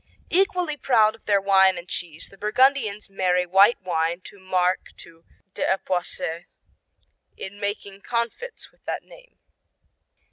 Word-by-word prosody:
Equally 360 -4 +1
proud 220 -6 +4
of - - -18
their 200 -1 +3
wine 190 -1 +4
and 175 - -8
cheese, 170 -3 -6
the 195 - -16
Burgundians 215 -1 +2
marry 180 -2 +1
white 195 +6 +5
wine 170 0 -1
or 200 - -17
marc 185 -1 0
to 165 0 -15 0.3
d'Epoisses 175 -3 -2 0.9
in 200 +2 -8
making 200 -1 -4
confits 235 - -4
with - - -34
that - - -3
name. - - -18
195 Hz, 130 wpm, -24 LUFS, 180-230 Hz, 0.9 s, white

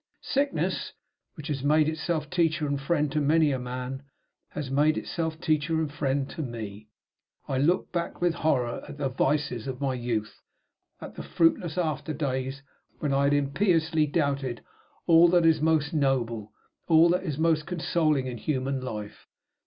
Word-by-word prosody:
Sickness, 280 +1 -1 0.4
which 155 - -9
has 140 -3 -2
made 150 +2 +3
itself 155 0 -2
teacher 165 -3 +1
and 140 -1 -2
friend 150 0 0
to 150 +1 0
many 155 +1 +3
a 130 - -1
man, 125 +1 -5 0.5
had 135 -3 -5
made 150 +3 +3
itself 160 -2 -3
teacher 155 -1 0
and 155 -2 -2
friend 135 -1 -1
to - - -5
me. 110 -5 -6 0.6
I 130 - -1
looked 170 +7 +1
back 170 -1 -3
with 175 -1 +2
horror 135 -8 0
at - - -9
the 140 -2 -1
vices 135 -2 0
of 130 -1 -4
my 135 -2 0
youth; 120 -4 -3 0.6
at - - -8
the - - -7
fruitless 165 0 +1
after 155 -3 -1
days 135 -1 -3 0.3
when 145 -2 -1
I 140 +1 +3
had 140 - +3
impiously 160 +2 +2
doubted 140 -5 -1 0.4
all 165 0 +7
that 175 -1 +4
is 160 -2 +4
most 160 0 +2
noble, 120 -7 0 0.4
all 165 0 +6
that 180 +2 +2
is 155 -7 -3
most 160 -1 +1
consoling 160 -5 +1
in 125 -2 -5
human 135 0 -1
life. 105 -4 -7
145 Hz, 165 wpm, -27 LUFS, 135-160 Hz, 0.6 s, all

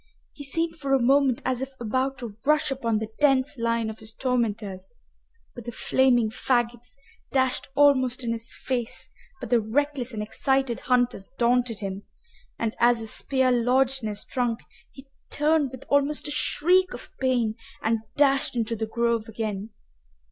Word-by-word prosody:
He 290 - -9
seemed 330 +4 -1
for 275 -3 -1
a - - +3
moment 265 0 +3
as 255 -1 0
if 270 0 -5
about 260 +4 -1
to 235 -5 -7
rush 300 +1 +2
upon 230 -5 0
the 215 0 -4
dense 275 -1 +3
line 230 -1 0
of 220 0 -6
his 220 0 -7
tormentors, 215 -7 -2 0.6
but 240 -3 -10
the 240 - -4
flaming 245 -2 +2
faggots 240 0 -1 0.4
dashed 260 -1 +1
almost 260 -3 +3
in 235 - -1
his 230 +2 -3
face 245 -3 -3 0.3
by 250 - -5
the 240 - +4
reckless 260 +3 -1
and 215 -2 -4
excited 265 +2 0
hunters 245 -6 0
daunted 240 -2 +1
him, 195 0 -4 0.6
and, 225 -1 -2
as 240 0 +4
a - - -5
spear 260 +4 +1
lodged 255 +2 +2
in 220 - -3
his 210 -1 -4
trunk, 245 -2 -1 0.3
he 270 0 -14 0.2
turned 300 -1 +2
with 260 0 -11
almost 285 +2 +1
a - - -3
shriek 360 +5 +2
of - - -10
pain 245 -4 +1 0.3
and 225 0 +1 0.2
dashed 275 -2 +3
into 230 -1 -1
the 220 0 -3
grove 235 0 0
again. 215 -2 -4
245 Hz, 165 wpm, -25 LUFS, 230-270 Hz, 0.6 s, the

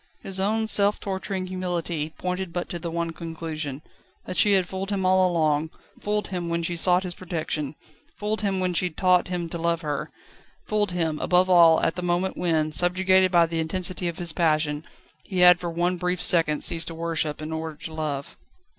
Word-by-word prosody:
His 190 0 0
own 220 +3 +1
self 205 -1 +3
torturing 190 -1 -4
humility 175 -4 -3
pointed 180 0 -3
but 175 +1 -3
to 175 - -4
the 170 - -4
one 170 0 -2
conclusion: 160 -3 -6 0.4
that 185 - -5
she 205 +3 +4
had 190 -2 +2
fooled 190 +1 -5
him 195 -2 -1
all 185 0 +4
along; 155 -2 +1 0.3
fooled 210 0 -1
him 175 -2 -3
when 170 0 -1
she 175 +1 -2
sought 180 +2 +3
his 180 -1 -5
protection; 160 -5 -4 0.4
fooled 215 +1 -2
him 195 -2 0
when 185 -1 0
she 180 +1 +1
taught 180 +2 +2
him 175 -2 -3
to 170 - -5
love 170 0 0
her; 145 -2 -3 0.6
fooled 210 -1 0
him, 165 -3 -1
above 185 +1 +2
all, 165 -2 +7
at 165 - 0
the - - -2
moment 180 +1 0
when, 160 -3 0
subjugated 185 +3 +3
by 170 -2 +5
the 165 0 -3
intensity 180 +2 0
of 170 -1 -4
his 175 -3 -1
passion, 155 -2 +1 0.4
he 185 -3 -2
had 180 0 +8
for 175 - -4
one 175 +2 0
brief 180 0 -1
second 160 -5 +3
ceased 165 0 +2
to 165 - -6
worship 160 -2 -2
in 155 +1 -6
order 160 -1 -4
to 160 +2 -9
love. 150 -3 -4
175 Hz, 200 wpm, -25 LUFS, 160-185 Hz, 0.6 s, had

